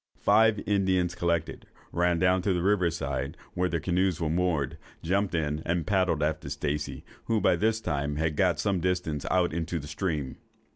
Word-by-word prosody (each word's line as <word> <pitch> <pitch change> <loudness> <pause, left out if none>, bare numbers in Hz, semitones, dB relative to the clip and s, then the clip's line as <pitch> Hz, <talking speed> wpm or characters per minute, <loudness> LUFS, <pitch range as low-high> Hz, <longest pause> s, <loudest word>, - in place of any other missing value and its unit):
Five 110 -2 +4
Indians 95 -3 +1
collected, 85 -2 -2 0.2
ran 85 0 +2
down 90 +1 +3
to 95 +1 +1
the 90 -1 -1
river 95 -3 +3
side, 70 -4 -3 0.2
where 90 +1 0
their 85 - -1
canoes 90 0 0
were 80 -2 -1
moored, 80 -6 0 0.2
jumped 95 +2 0
in, 75 -1 -1
and 85 -1 -1
paddled 90 -5 +1
after 75 -2 -1
Stacey, 75 +1 -3 0.2
who 115 -1 +1
by - - +3
this 110 0 +1
time 75 -7 -2
had 80 0 -1
got - - +2
some 100 -3 +1
distance 85 -5 -1
out 90 -3 +2
into 85 0 -2
the 75 - -6
stream. 75 -4 -3
85 Hz, 180 wpm, -28 LUFS, 75-95 Hz, 0.2 s, Five